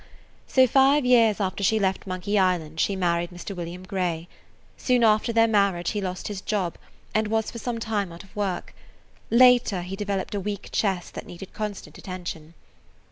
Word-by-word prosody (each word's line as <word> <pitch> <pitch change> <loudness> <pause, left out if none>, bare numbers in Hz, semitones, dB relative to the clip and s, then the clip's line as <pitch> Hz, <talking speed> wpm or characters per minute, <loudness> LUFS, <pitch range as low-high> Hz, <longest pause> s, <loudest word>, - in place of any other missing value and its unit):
So, 260 -1 +5
five 270 +2 +4
years 230 -4 +4
after 195 0 -2
she 220 +3 +3
left 195 -1 -1
Monkey 195 +3 -1
Island, 170 -4 0
she 200 - +1
married 175 -2 0
Mr. 180 +2 -8
William 175 +1 -6
Grey. 180 -4 -2 0.5
Soon 250 -2 +1
after 215 +1 +3
their 225 0 +4
marriage 200 -5 +2
he 205 - -2
lost 185 -1 -4
his 205 -2 -5
job 195 -6 -1 0.4
and 215 0 +1
was 220 0 0
for 235 - -7
some 240 0 -3
time 210 -5 -2
out 170 - -10
of 195 - -20
work; 200 -3 -3 0.6
later 240 -6 +5
he 185 +2 -5
developed 200 -1 -3
a 205 - -1
weak 200 0 -5
chest 190 -4 -1
that - - -7
needed 180 +2 -10
constant 210 -2 -6
attention. 170 -3 -7
200 Hz, 180 wpm, -25 LUFS, 180-220 Hz, 0.6 s, So